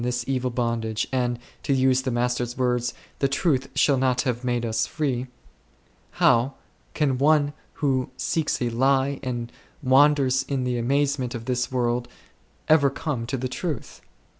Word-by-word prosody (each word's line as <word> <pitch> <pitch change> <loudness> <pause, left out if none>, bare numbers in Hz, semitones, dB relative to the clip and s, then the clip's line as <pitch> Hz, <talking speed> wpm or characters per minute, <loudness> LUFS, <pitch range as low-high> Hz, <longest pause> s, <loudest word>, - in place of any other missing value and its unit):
this 125 -1 -1
evil 130 -1 0
bondage, 115 -2 -1
and, 125 -2 0 0.2
to 140 - 0
use 130 -1 +3
the 130 - -2
Master's 120 0 -1
words, 125 -1 0
" - - -32
the 140 - +3
truth 135 -1 0
shall 140 -2 +4
not 130 -1 +2
have 125 -1 -2
made 120 -1 0
us 110 0 0
free," 130 -5 -2 0.9
how 120 +4 +3 0.4
can 135 -5 +1
one 145 0 +3 0.2
who 135 -5 0
seeks 160 -2 -1
a 120 - 0
lie 135 +3 +2
and 120 -3 -4 0.3
wanders 135 -1 +4
in 135 -2 -1
the 125 -1 -1
maze 140 +3 +1
off 120 -2 -4
this 125 0 -1
world 120 -1 0 0.6
ever 150 -3 +5
come 135 -4 -4
to 135 - -2
the 130 +1 -2
truth 150 +2 -5
130 Hz, 160 wpm, -24 LUFS, 120-140 Hz, 0.9 s, ever